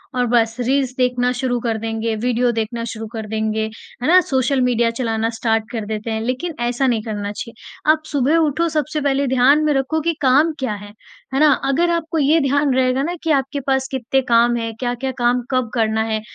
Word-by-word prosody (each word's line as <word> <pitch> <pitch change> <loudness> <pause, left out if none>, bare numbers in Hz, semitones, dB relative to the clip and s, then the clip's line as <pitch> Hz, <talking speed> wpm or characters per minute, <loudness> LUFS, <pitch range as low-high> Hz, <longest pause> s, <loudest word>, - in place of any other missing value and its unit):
और 250 -1 +1
बस 225 -1 +2
रील्स 260 +1 0
देखना 250 -1 +1
शुरू 250 -1 -1
कर 225 -2 -1
देंगे, 225 0 -2
वीडियो 245 +2 +1
देखना 230 +1 -3
शुरू 225 0 -6
कर 220 -1 -5
देंगे। 220 0 -1 0.4
है 250 - -1
ना? 360 +3 +7
सोशल 265 -3 0
मीडिया 240 -2 +2
चलाना 225 -2 -1
स्टार्ट 225 -1 -1
कर 225 -3 -4
देते 215 +1 -4
हैं 220 0 -2
लेकिन 255 +8 -3
ऐसा 240 +3 0
नहीं 235 -3 +1
करना 205 -2 -4
चाहिए। 230 +7 -7
आप 310 0 0
सुबह 285 +3 +2
उठो 325 +1 +1
सबसे 305 -1 -2
पहले 280 0 +1
ध्यान 260 +4 +4
में 305 -1 +2
रखो 275 +3 0
कि 335 +2 0
काम 285 +4 +4
क्या 260 -5 -2
है। 205 0 -9 0.4
है 270 - +1
ना? 305 0 +6
अगर 280 +6 +1
आपको 330 -1 -2
ये 305 +2 +4
ध्यान 280 0 +2
रहेगा 255 0 +2
ना 345 +4 -2
कि 325 - +1
आपके 275 0 0
पास 265 -1 +1
कितने 265 0 0
काम 235 +1 +4
हैं, 230 -1 -3
क्या-क्या 245 +1 -2
काम 245 +1 +2
कब 255 -3 0
करना 220 -2 +1
है, 220 -1 -2
250 Hz, 210 wpm, -19 LUFS, 225-275 Hz, 0.4 s, ना